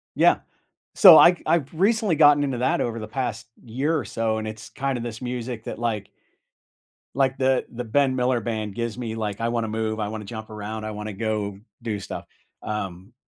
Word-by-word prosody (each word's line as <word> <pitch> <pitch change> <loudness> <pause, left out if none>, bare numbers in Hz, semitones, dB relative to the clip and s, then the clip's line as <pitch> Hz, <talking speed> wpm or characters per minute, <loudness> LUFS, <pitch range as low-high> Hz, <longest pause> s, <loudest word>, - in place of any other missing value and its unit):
Yeah. - - +4 0.6
So, 180 -6 +10
I 175 0 +7
I've 155 -4 +1
recently 205 +1 +2
gotten 145 -1 +6
into 135 -4 -2
that 125 - +1
over 115 -1 -2
the 110 - -6
past 115 -2 -4 0.2
year 135 +8 0
or - - -3
so, 115 -1 -1
and 110 0 -4
it's 110 +1 -8
kinda 135 -3 -2
this 115 0 -6
music, 125 -2 -5
that, - - -5
like 110 -4 -2 1.1
like 135 -1 +1
The 130 -1 +2
the 125 0 -5
Ben 135 +3 +2
Miller 125 -1 +1
Band 110 -3 -3
gives 115 -1 -3
me, 115 -3 -4
like, 105 -3 -3
"I 115 - 0
wanna 115 -1 -1
move, 110 0 -2
I 105 -1 -2
wanna 110 -1 -6
jump 110 +1 -8
around, 110 +1 -6
I 110 - -4
wanna 105 0 -6
go 105 -1 -2 0.2
do 110 -3 -3
stuff." - - -7 0.4
Um, 100 0 -5
115 Hz, 195 wpm, -24 LUFS, 110-130 Hz, 1.1 s, So